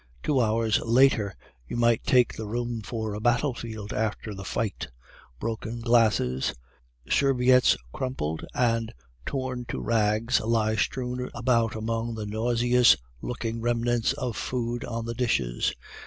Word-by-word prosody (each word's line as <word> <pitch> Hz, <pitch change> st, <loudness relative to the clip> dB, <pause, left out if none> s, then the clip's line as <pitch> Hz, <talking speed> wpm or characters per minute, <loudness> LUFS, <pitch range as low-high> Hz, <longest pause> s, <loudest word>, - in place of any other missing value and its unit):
Two 145 Hz, -3 st, +2 dB
hours 110 Hz, -1 st, +2 dB
later 115 Hz, -4 st, +3 dB, 0.3 s
you -, -, -4 dB
might 120 Hz, -1 st, +3 dB
take 125 Hz, -2 st, +3 dB
the 110 Hz, -, -5 dB
room 120 Hz, +1 st, -3 dB
for 110 Hz, 0 st, -4 dB
a 105 Hz, -, -4 dB
battlefield 115 Hz, -3 st, -1 dB
after 110 Hz, 0 st, -2 dB
the 100 Hz, 0 st, -7 dB
fight. 100 Hz, -, -3 dB, 0.5 s
Broken 115 Hz, +3 st, -4 dB
glasses, 110 Hz, -, +2 dB, 0.5 s
serviettes 130 Hz, -2 st, +4 dB, 0.2 s
crumpled 80 Hz, -, -3 dB
and 115 Hz, -2 st, +1 dB, 0.4 s
torn 130 Hz, -2 st, -3 dB
to -, -, -4 dB
rags 115 Hz, +2 st, +2 dB
lie 110 Hz, -1 st, +1 dB
strewn 125 Hz, +4 st, -2 dB
about 120 Hz, -2 st, +1 dB
among 115 Hz, +1 st, -2 dB
the 110 Hz, -1 st, -4 dB
nauseous 120 Hz, -, +3 dB, 0.2 s
looking 115 Hz, -2 st, -4 dB
remnants 120 Hz, +1 st, +1 dB
of 130 Hz, -5 st, -3 dB
food 120 Hz, +1 st, -2 dB
on 115 Hz, 0 st, -4 dB
the 115 Hz, -, -3 dB
dishes. 70 Hz, -, 0 dB
115 Hz, 130 wpm, -27 LUFS, 110-120 Hz, 0.5 s, serviettes